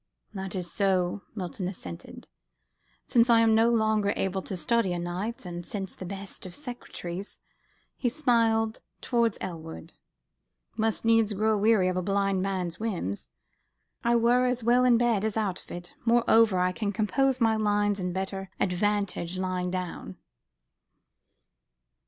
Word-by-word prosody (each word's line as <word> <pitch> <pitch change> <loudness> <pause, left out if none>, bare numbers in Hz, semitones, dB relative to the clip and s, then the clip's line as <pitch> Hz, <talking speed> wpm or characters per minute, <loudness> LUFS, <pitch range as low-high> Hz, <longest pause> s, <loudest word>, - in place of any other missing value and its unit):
"That 190 -2 -5
is 180 -2 -4
so," 190 -1 +1
Milton 185 -2 -4
assented, 90 - -8 0.8
"since 235 0 +3
I 230 -1 +6
am 225 -1 +4
no 225 +1 +5
longer 220 -3 +2
able 190 0 -1
to 185 - -5
study 185 +2 +1
o' - - -2
nights, 185 +7 -4
and 175 -1 -6
since 195 0 -4
the 185 - -7
best 195 0 -7
of 175 - -9
secretaries," 200 -8 -7 0.6
he 245 - +1
smiled 230 -5 +1 0.2
towards 235 -3 +1
Elwood 165 -1 -7 0.8
"must 225 0 0
needs 225 -2 +4
grow 215 +2 +2
weary 210 -2 +3
of 185 0 0
a - - +1
blind 195 0 +1
man's 185 -3 -2
whims, 180 - -3 0.7
I 235 0 +3
were 240 +2 +4
as 250 -1 -1
well 245 +2 +4
in 245 -2 +5
bed 230 -4 +2
as 220 0 -1
out 200 -5 -1
of - - -21
it. 175 0 -8
Moreover, 230 -3 +4
I 180 0 +2
can 200 +2 -2
compose 255 +6 +1
my 225 -2 +3
lines 205 -1 +1
to 180 -1 -2
better 190 +1 -4
advantage 185 -2 0
lying 185 -1 -1
down." 180 - -5
200 Hz, 150 wpm, -28 LUFS, 185-225 Hz, 0.8 s, I